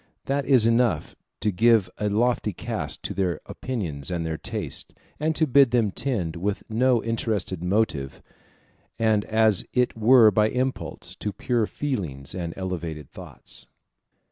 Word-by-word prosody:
That 140 0 -1
is 130 -5 +5
enough 115 0 +1 0.3
to 105 - +1
give 110 0 +4
a 105 - 0
lofty 110 0 +1
cast - - -4
to - - -3
their 90 -5 -1
opinions 85 - -5
and 85 -2 -2
their 80 -1 -2
tastes, - - -5 0.3
and 155 +1 0
to 160 - +3
bid 140 -2 +5
them 115 -4 +2
tend 95 -10 -2
with 100 +4 -2
no 120 +1 +3
interested 110 -6 -2
motive, 90 -9 0 0.8
and 110 -2 +2
as 110 -3 +3
it 125 -1 +1
were 115 0 +6
by 105 +2 +3
impulse, 130 +2 -3
to 105 - -3
pure 115 +1 0
feelings 85 - -4
and 85 -2 -4
elevated 85 -6 -5
thoughts. - - -12
110 Hz, 145 wpm, -25 LUFS, 90-120 Hz, 0.8 s, were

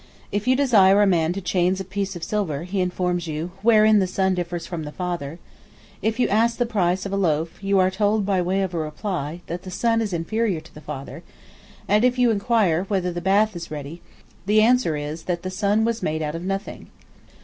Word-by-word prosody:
If 205 +3 -2
you 255 - +5
desire 205 -8 +5
a - - +5
man 170 -4 +2
to 195 - -5
change 180 +1 +1
a - - -3
piece 195 +1 -4
of 170 - -7
silver, 170 -7 -2
he 185 +2 -2
informs 180 -1 -1
you, 160 +3 -4
wherein 215 -1 +5
the 190 - +1
Son 190 +1 +1
differs 175 -1 -3
from 170 -3 -5
the 150 -1 -6
Father; 170 -4 -4 0.6
if 220 +2 -1
you 250 - +3
ask 230 +3 +2
the 245 - +1
price 190 -5 0
of 200 - -4
a - - 0
loaf, 165 -1 -1
you 195 0 +2
are 185 0 +3
told 205 +1 +1
by 190 -2 +1
way 190 +2 0
of 185 -2 -3
reply, 160 0 -4
that 170 +1 -5
the 190 - -9
Son 230 +4 +1
is 215 -3 -2
inferior 185 +2 -1
to 155 +1 -17
the 150 - -12
Father; 140 -2 -7 0.7
and 210 +3 +3
if 250 0 +3
you 245 -2 +4
inquire, 200 -5 +1
whether 190 -3 -1
the 175 - -4
bath 200 +3 +2
is 170 -1 -7
ready, 150 +2 -7 0.5
the 210 +1 +4
answer 225 -8 +3
is, 150 +2 -6
that 175 -2 -2
the 185 - -4
Son 205 +3 +1
was 230 -1 -1
made 155 0 -1
out 150 0 -3
of 165 - -5
nothing." 195 +2 -4
190 Hz, 220 wpm, -23 LUFS, 170-210 Hz, 0.7 s, you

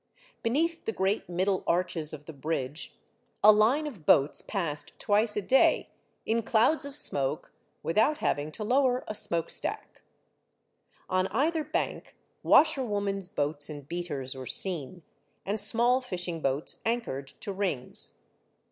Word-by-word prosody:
Beneath 325 +8 0
the - - 0
great 195 -2 -1
middle 185 +2 0
arches 170 -3 0
of 150 -1 -9
the 160 - -9
bridge, 145 0 -4 0.5
a 210 - +10
line 225 +9 +3
of 235 - -7
boats 140 0 +4
passed 165 -8 -3
twice 210 +1 +2
a 210 - -1
day, 265 +7 +3 0.4
in 230 +1 +1
clouds 240 +8 +2
of 280 -1 -6
smoke, 140 - -1 0.3
without 215 - +2
having 145 +2 -1
to 215 - -4
lower 255 +2 +2
a - - -3
smoke 170 -5 -1
stack. - - -4 1.1
On 185 0 +1
either 310 +9 0
bank, 310 +4 -3 0.3
washerwomen's 205 - +3
boats 145 -4 -1
and 145 -2 -8
beaters 150 -6 -4
were 130 -2 -8
seen, 175 -2 +1 0.4
and 205 +3 -1
small 240 +5 +3
fishing 175 -8 -4
boats 135 +2 -1
anchored 225 - -2
to 200 - -4
rings. 185 - -3
195 Hz, 140 wpm, -28 LUFS, 155-230 Hz, 1.1 s, a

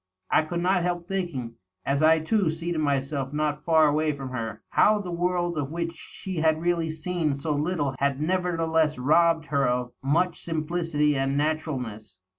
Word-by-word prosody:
I - - +5
could 170 +2 -3
not 180 0 +2
help 175 0 -2
thinking, 170 -12 -4 0.3
as 140 +1 +1
I 160 +1 +6
too 185 +3 +1
seated 165 +1 -3
myself 140 -1 -1
not 150 0 -1
far 160 -2 +5
away 150 +1 +1
from 135 -2 -6
her, 115 -4 -5
how 215 0 +4
the 185 -3 -5
world 175 -1 0
of 140 -2 -2
which 170 +1 -3
she 185 +2 -8
had 160 0 +2
really 170 -1 0
seen 160 -1 -1
so 150 +2 -2
little 145 -2 -1
had 140 -1 +1
nevertheless 165 -2 +1
robbed 160 +4 +3
her 140 -2 +1
of 125 0 -1
much 165 +6 +1
simplicity 155 -2 0
and 135 +1 0
naturalness. 130 -10 -3
155 Hz, 170 wpm, -26 LUFS, 140-170 Hz, 0.3 s, I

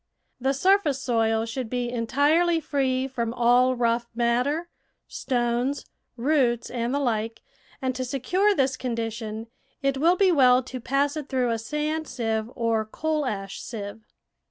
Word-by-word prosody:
The 265 +2 +1
surface 350 -3 +3
soil 225 -3 +1
should 230 +1 -4
be 245 0 -2
entirely 290 +8 +2
free 265 -4 0
from 235 -3 -3
all 245 +1 +4
rough 235 -1 +1
matter, 250 +8 +1 0.4
stones, 245 +2 -1 0.3
roots, 245 -3 +1
and 240 -1 -2
the 280 - +1
like, 225 -4 -2 0.4
and 260 0 0
to 255 0 -3
secure 355 +11 +1
this 265 -3 +1
condition, 225 -2 -4 0.4
it 275 -1 +1
will 335 +5 +4
be 380 0 +4
well 255 -5 +5
to 255 0 -7
pass 275 +4 0
it 300 -3 -5
through 255 -3 +1
a 230 - -1
sand 300 +5 -2
sieve 225 -3 -2
or 230 -2 +1
coal 300 +6 -2
ash 195 -4 -4
sieve. 210 -1 -7
255 Hz, 150 wpm, -25 LUFS, 230-285 Hz, 0.4 s, well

